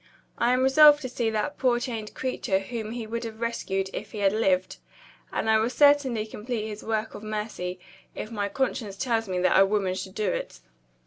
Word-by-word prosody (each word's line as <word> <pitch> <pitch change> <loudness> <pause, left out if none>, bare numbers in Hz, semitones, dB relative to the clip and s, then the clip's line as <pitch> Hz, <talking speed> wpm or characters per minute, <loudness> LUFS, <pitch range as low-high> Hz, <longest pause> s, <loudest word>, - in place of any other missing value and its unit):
I 235 +1 +3
am 255 +1 +2
resolved 295 +2 +7
to 255 - -3
see 235 -2 -1
that 220 +7 -2
poor 245 -2 +3
chained 225 -4 -5
creature 250 -6 -1
whom 220 +2 -5
he 235 -2 -5
would 230 +2 -4
have 225 -1 -7
rescued 195 -5 -2
if - - -6
he - - -6
had 200 -1 +2
lived; 190 -4 +1 0.5
and - - -2
I 220 0 +5
will 225 +2 +1
certainly 275 -5 +4
complete 220 +1 -4
his 210 -1 -7
work 220 0 -2
of - - -8
mercy, 210 -4 -4 0.4
if 215 - -6
my 205 -2 -2
conscience 225 -5 -2
tells 225 -3 -1
me 185 - -1
that 185 - +4
a - - +8
woman 195 -2 0
should 190 0 -6
do 210 -4 0
it." - - -5
220 Hz, 205 wpm, -26 LUFS, 200-240 Hz, 0.5 s, a